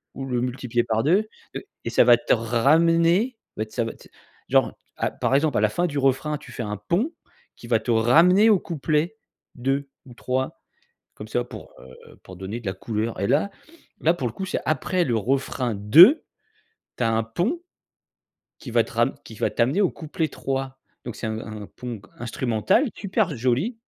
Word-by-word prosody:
ou 135 Hz, -, -5 dB
le 125 Hz, -2 st, -1 dB
multiplier 125 Hz, -1 st, -1 dB
par 110 Hz, 0 st, 0 dB
2, 190 Hz, +8 st, +3 dB, 0.3 s
heu, -, -, -5 dB, 0.2 s
et -, -, -3 dB
ça -, -, +5 dB
va 120 Hz, -1 st, +7 dB
te -, -, +1 dB
ramener, 165 Hz, -, +3 dB, 0.2 s
beh, 110 Hz, 0 st, -2 dB
ça 115 Hz, -, -1 dB
va 115 Hz, -, -4 dB
te -, -, -18 dB, 0.4 s
genre -, -, +3 dB, 0.2 s
à -, -, -1 dB
par 135 Hz, -, 0 dB
exemple, 145 Hz, -2 st, +2 dB
à -, -, 0 dB
la 110 Hz, -, +3 dB
fin 175 Hz, +12 st, 0 dB
du 145 Hz, -4 st, -2 dB
refrain, 135 Hz, +3 st, +1 dB
tu -, -, -13 dB
fais 120 Hz, -, -5 dB
un 105 Hz, 0 st, -4 dB
pont 175 Hz, -, -1 dB, 0.4 s
qui 120 Hz, -, -12 dB
va 115 Hz, -2 st, +3 dB
te 120 Hz, -, -2 dB
ramener 165 Hz, -, +5 dB
au 205 Hz, -, +6 dB
couplet 160 Hz, +4 st, -1 dB, 0.4 s
2 135 Hz, +2 st, -1 dB, 0.2 s
ou 125 Hz, -, -13 dB
3, 130 Hz, +2 st, -3 dB, 0.5 s
comme 105 Hz, -, -9 dB
ça, 120 Hz, +2 st, -1 dB
pour, 120 Hz, -, -11 dB
heu, 65 Hz, 0 st, -15 dB
pour 90 Hz, -, -11 dB
donner 95 Hz, +6 st, -6 dB
de 115 Hz, -, -15 dB
la 95 Hz, -, -1 dB
couleur. 110 Hz, +3 st, -3 dB
Et 100 Hz, -, 0 dB
là, 160 Hz, -, +2 dB, 0.5 s
là, 165 Hz, +2 st, +4 dB
pour 135 Hz, -8 st, -3 dB
le 115 Hz, -, -6 dB
coup, 190 Hz, -, -5 dB
c'est 185 Hz, -, -2 dB
après 165 Hz, +5 st, 0 dB
le 120 Hz, -7 st, 0 dB
refrain 125 Hz, 0 st, -1 dB
2, 165 Hz, -, +7 dB, 0.7 s
tu -, -, -1 dB
as 115 Hz, -, +2 dB
un 115 Hz, 0 st, +1 dB
pont, 180 Hz, -, -2 dB, 1.0 s
qui 130 Hz, -, -9 dB
va 115 Hz, -1 st, +4 dB
te -, -, -12 dB
rame 120 Hz, +4 st, +1 dB
qui -, -, -12 dB
va -, -, 0 dB
t'amener 130 Hz, +12 st, +1 dB
au 190 Hz, -, +3 dB
couplet 160 Hz, 0 st, -3 dB
3, 135 Hz, -2 st, -4 dB, 0.3 s
donc 120 Hz, -, -6 dB
c'est -, -, -6 dB
un 110 Hz, 0 st, -3 dB
un 110 Hz, -2 st, -7 dB
pont 120 Hz, -4 st, -7 dB
qu 100 Hz, -, -20 dB
instrumental 120 Hz, -, +1 dB
super 195 Hz, -, -1 dB
joli. 130 Hz, -, 0 dB
130 Hz, 200 wpm, -24 LUFS, 115-165 Hz, 1.0 s, va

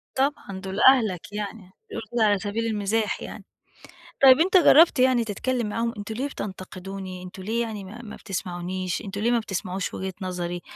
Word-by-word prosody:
طبعًا 265 Hz, -8 st, -1 dB
دول 190 Hz, +1 st, -5 dB
أهلك 220 Hz, -9 st, +4 dB
يعني، 205 Hz, -2 st, -6 dB, 0.2 s
بيقولوا 225 Hz, -, -6 dB
كده 240 Hz, -2 st, +2 dB
على 205 Hz, -2 st, +3 dB
سبيل 210 Hz, +4 st, -2 dB
المِزاح 215 Hz, 0 st, -1 dB
يعني، -, -, -8 dB, 0.8 s
طَب 260 Hz, -1 st, +9 dB
أنت 375 Hz, +3 st, +4 dB
جرّبت 325 Hz, -3 st, +7 dB
يعني 255 Hz, -2 st, +4 dB
تتكلّم 230 Hz, +2 st, -2 dB
معاهم 230 Hz, +2 st, -1 dB
أنتم 205 Hz, +2 st, -5 dB
ليه 260 Hz, +5 st, -2 dB
بتنتقدوني، 190 Hz, -3 st, -7 dB
أنتم 185 Hz, +1 st, -9 dB
ليه 225 Hz, +4 st, -1 dB
يعني 215 Hz, -4 st, -5 dB
ما 225 Hz, +6 st, -10 dB
ما 215 Hz, -3 st, -9 dB
بتسمعونيش، 180 Hz, -1 st, -4 dB
أنتم 200 Hz, 0 st, -5 dB
ليه 230 Hz, +3 st, +2 dB
ما 240 Hz, -, +3 dB
بتسمعوش 190 Hz, -3 st, -3 dB
وجهة 190 Hz, 0 st, -4 dB
نظري، 175 Hz, -1 st, -3 dB
205 Hz, 175 wpm, -25 LUFS, 190-235 Hz, 0.8 s, طَب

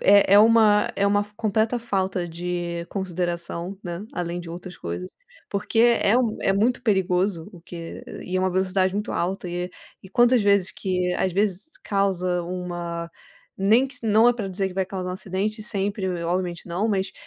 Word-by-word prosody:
é 200 Hz, 0 st, +6 dB
é -, -, +9 dB
uma 220 Hz, -1 st, +5 dB
é 200 Hz, -, +2 dB
uma 205 Hz, 0 st, +3 dB
f 210 Hz, -, -16 dB
completa 220 Hz, +2 st, +1 dB
falta 190 Hz, -5 st, -1 dB
de 170 Hz, 0 st, -4 dB
consideração, 175 Hz, -1 st, -3 dB
né, 175 Hz, +3 st, -5 dB
além 175 Hz, 0 st, -3 dB
de 170 Hz, -, -9 dB
outras 175 Hz, +1 st, -8 dB
coisas, 85 Hz, +2 st, -5 dB, 0.4 s
porque 200 Hz, +3 st, -2 dB
é 235 Hz, -1 st, +4 dB
um 230 Hz, -4 st, 0 dB
é 195 Hz, -, +2 dB
muito 225 Hz, +6 st, +1 dB
perigoso, 190 Hz, -3 st, +1 dB
o 175 Hz, -, -13 dB
que 165 Hz, -1 st, -8 dB, 0.2 s
e 185 Hz, +1 st, -2 dB
é -, -, +2 dB
uma 185 Hz, -, +1 dB
velocidade 185 Hz, 0 st, +1 dB
muito 210 Hz, +1 st, -2 dB
alta 180 Hz, +1 st, -2 dB
e 175 Hz, +1 st, -3 dB, 0.3 s
e 190 Hz, -, -12 dB
quantas 240 Hz, +2 st, +4 dB
vezes 200 Hz, -2 st, +3 dB
que, 180 Hz, -1 st, -1 dB
às 185 Hz, -, 0 dB
vezes, 200 Hz, -, 0 dB
causa 185 Hz, -3 st, 0 dB
uma 175 Hz, -1 st, -4 dB, 0.5 s
nem 220 Hz, +7 st, +4 dB
que 275 Hz, -, -11 dB
não 225 Hz, +2 st, +5 dB
é -, -, +5 dB
para 215 Hz, -5 st, -4 dB
dizer 190 Hz, +1 st, -1 dB
que 180 Hz, -, -11 dB
vai 190 Hz, -1 st, +1 dB
causar 185 Hz, -1 st, -4 dB
um -, -, -3 dB
acidente 205 Hz, +3 st, -3 dB
sempre, 200 Hz, -2 st, -2 dB, 0.2 s
obviamente 175 Hz, 0 st, -2 dB
não, 180 Hz, +6 st, -1 dB
mas 195 Hz, -2 st, -1 dB
190 Hz, 185 wpm, -24 LUFS, 180-205 Hz, 0.5 s, é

